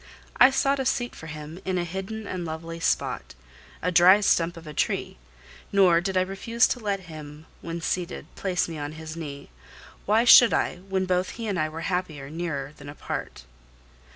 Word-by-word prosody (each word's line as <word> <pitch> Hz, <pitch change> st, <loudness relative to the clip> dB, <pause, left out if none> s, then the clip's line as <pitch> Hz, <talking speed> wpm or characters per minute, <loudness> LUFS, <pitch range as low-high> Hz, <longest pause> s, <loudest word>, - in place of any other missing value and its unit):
I 255 Hz, -, +8 dB
sought 275 Hz, +1 st, +1 dB
a 265 Hz, -, -1 dB
seat 245 Hz, -2 st, -1 dB
for 160 Hz, -, -10 dB
him 155 Hz, +2 st, -8 dB
in 185 Hz, -1 st, -1 dB
a 175 Hz, -, 0 dB
hidden 190 Hz, +5 st, -5 dB
and 185 Hz, -3 st, -4 dB
lovely 165 Hz, +1 st, -6 dB
spot, 165 Hz, -, -1 dB, 0.5 s
a 180 Hz, -, +1 dB
dry 180 Hz, +3 st, +7 dB
stump 170 Hz, -3 st, +2 dB
of 165 Hz, -, -11 dB
a 150 Hz, -, -8 dB
tree; -, -, -1 dB, 0.5 s
nor 185 Hz, -4 st, +5 dB
did 190 Hz, +1 st, -2 dB
I -, -, +5 dB
refuse 195 Hz, +6 st, +1 dB
to 250 Hz, -, -1 dB
let 200 Hz, -3 st, -2 dB
him, 155 Hz, -3 st, -10 dB, 0.2 s
when 170 Hz, 0 st, -5 dB
seated, 180 Hz, +1 st, -3 dB
place 180 Hz, -2 st, -1 dB
me 165 Hz, -2 st, -6 dB
on 145 Hz, +1 st, -5 dB
his 160 Hz, 0 st, -8 dB
knee. 145 Hz, -, -8 dB, 0.6 s
Why 220 Hz, +3 st, +4 dB
should 240 Hz, -1 st, +8 dB
I, -, -, 0 dB
when 190 Hz, +1 st, -2 dB
both 180 Hz, 0 st, 0 dB
he 230 Hz, -, -5 dB
and 200 Hz, -4 st, -1 dB
I 155 Hz, 0 st, 0 dB
were 160 Hz, +1 st, -7 dB
happier 165 Hz, -7 st, -3 dB
near 155 Hz, -4 st, -4 dB
than 140 Hz, 0 st, -10 dB
apart? 105 Hz, -, -6 dB
175 Hz, 190 wpm, -26 LUFS, 160-195 Hz, 0.6 s, I